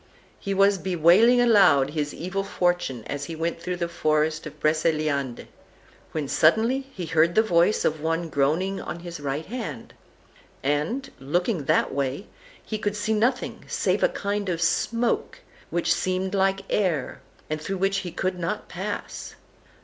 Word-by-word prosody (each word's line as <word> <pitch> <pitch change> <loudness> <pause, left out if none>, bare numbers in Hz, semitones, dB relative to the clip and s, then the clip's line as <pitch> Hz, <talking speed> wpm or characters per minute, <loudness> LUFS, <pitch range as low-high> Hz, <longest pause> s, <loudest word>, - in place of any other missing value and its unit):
He 195 0 -3
was 195 0 +4
bewailing 185 +8 +5
aloud 195 - +5
his 150 -1 -2
evil 190 +3 -3
fortune 175 - -1
as 140 +3 -4
he 165 - -6
went 165 +1 -3
through 180 +1 -3
the 175 -1 -2
forest 155 -2 0
of 150 0 -12
Breceliande, 155 -4 0 0.7
when 155 -3 -3
suddenly 230 - +3
he 180 - -5
heard 165 +1 +2
the 220 - +5
voice 175 0 +3
of 155 -1 0
one 165 +1 -1
groaning 160 +7 0
on 170 - -6
his 175 -2 -7
right 145 +2 -3
hand; 185 - -6 0.7
and, 150 - 0
looking 175 - -1
that - - +2
way, 140 +7 -2 0.4
he 215 - -4
could 205 -1 -1
see 210 +1 -1
nothing 245 +4 0
save - - 0
a - - +4
kind 200 - -2
of 170 -2 -1
smoke, 230 +8 0 0.3
which 175 - +1
seemed 185 +1 -1
like 195 0 +2
air, 170 -10 -1 0.3
and 155 0 -3
through 195 +5 -3
which 195 +1 +1
he 180 - -6
could 185 +1 -2
not 175 +5 -3
pass. - - -5
175 Hz, 155 wpm, -25 LUFS, 155-195 Hz, 0.7 s, bewailing